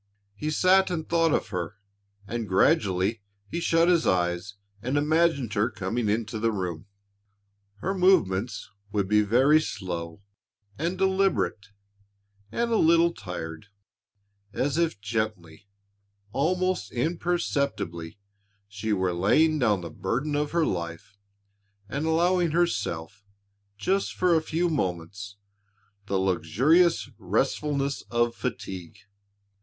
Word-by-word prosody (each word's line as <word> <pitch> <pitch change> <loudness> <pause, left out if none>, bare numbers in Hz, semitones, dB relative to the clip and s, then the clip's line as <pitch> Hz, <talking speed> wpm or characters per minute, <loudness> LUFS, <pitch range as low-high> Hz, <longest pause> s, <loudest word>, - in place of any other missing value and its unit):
He 150 +9 -4
sat 190 +5 +4
and 165 -3 -3
thought 165 -1 +2
of - - 0
her - - -4 0.5
and 115 +2 -4
gradually 100 - +2 0.3
he 170 - -3
shut 165 0 +3
his 175 -2 +3
eyes 90 +2 0 0.3
and 130 +5 -1
imagined 150 -5 +2
her 105 -1 +2
coming 105 +4 -2
into 110 +1 -1
the 115 +1 +1
room. 90 -3 -4 0.9
Her 190 - -1
movements 125 - +2 0.2
would 100 -2 0
be 105 +1 +4
very 130 +9 +4
slow 90 - -5 0.5
and 170 - -2
deliberate 190 - +1 0.8
and 235 0 -1
a 225 - +3
little 170 0 +4
tired, 85 - -7 0.9
as 140 +2 0
if 165 -11 0
gently, 105 -5 -4 0.6
almost 180 - 0
imperceptibly, 140 - -2 0.5
she 100 +2 -4
were 95 -2 0
laying 155 - +3
down 105 -7 +2
the 85 -2 -7
burden 140 - -2
of 145 0 0
her 170 0 +1
life 85 - -4 0.7
and 145 +8 -3
allowing 175 +2 +2
herself, 105 - -1 0.5
just 190 - 0
for 180 -1 +3
a 160 - +3
few 165 +2 0
moments, 100 - -3 0.7
the 100 - 0
luxurious 100 - +3
restfulness 140 -2 -1
of 120 0 +1
fatigue. 95 -7 -5
120 Hz, 115 wpm, -26 LUFS, -, 0.9 s, sat